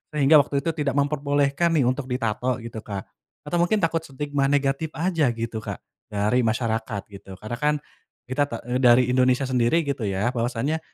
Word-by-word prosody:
sehingga 150 +1 +6
waktu 140 0 0
itu 165 - 0
tidak 140 -2 0
memperbolehkan 145 +3 +1
nih 145 - +3
untuk 130 +2 0
ditato 125 0 -1
gitu 115 -1 -6
Kak, 100 -3 -6 0.4
atau 160 +4 -2
mungkin 180 +2 +2
takut 165 0 +2
stigma 145 -1 -2
negatif 140 +2 +1
aja 165 -3 +1
gitu 115 -1 -4
Kak, - - -6 0.3
dari 105 +4 +1
masyarakat 110 -2 -1
gitu? 95 -1 -10
Karena 110 +4 -6
kan, 150 0 +2 0.6
kita 145 +2 +2
ta - - -5
eee, 125 +1 0
dari 125 -1 +5
Indonesia 130 +1 +3
sendiri 130 +6 +2
gitu 140 -5 -3
ya, 100 +5 0
bahwasanya 125 +6 -1
130 Hz, 175 wpm, -24 LUFS, 115-145 Hz, 0.6 s, sehingga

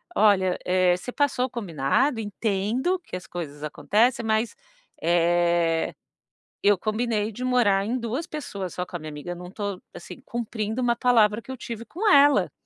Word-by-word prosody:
"Olha, 190 -4 +4
eh, 180 -1 +3
você 215 +7 -7
passou 285 -3 +1
o - - -5
combinado, 225 - 0
entendo 220 - -1
que - - -8
as 180 - -7
coisas 150 -4 -7
acontecem, 225 - +1
mas, 220 +1 +1 0.5
eh, 170 -1 +2 0.7
eu 205 -1 +5
combinei 215 +1 -1
de 245 +4 -7
morar 215 -6 +3
em 235 +4 -1
duas 245 +8 -3
pessoas, 200 - -5
só 180 - -2
com 180 - -10
a - - -14
minha 155 0 -7
amiga, 150 +4 -6
não 180 +1 -9
tô 200 -2 -4
assim, - - -10
cumprindo 225 0 -3
uma 240 -1 +2
palavra 230 -3 +3
que - - -21
eu - - -4
tive 230 -1 -7
com 325 - -10
ela. 285 -2 +5
210 Hz, 170 wpm, -25 LUFS, 180-240 Hz, 0.7 s, eu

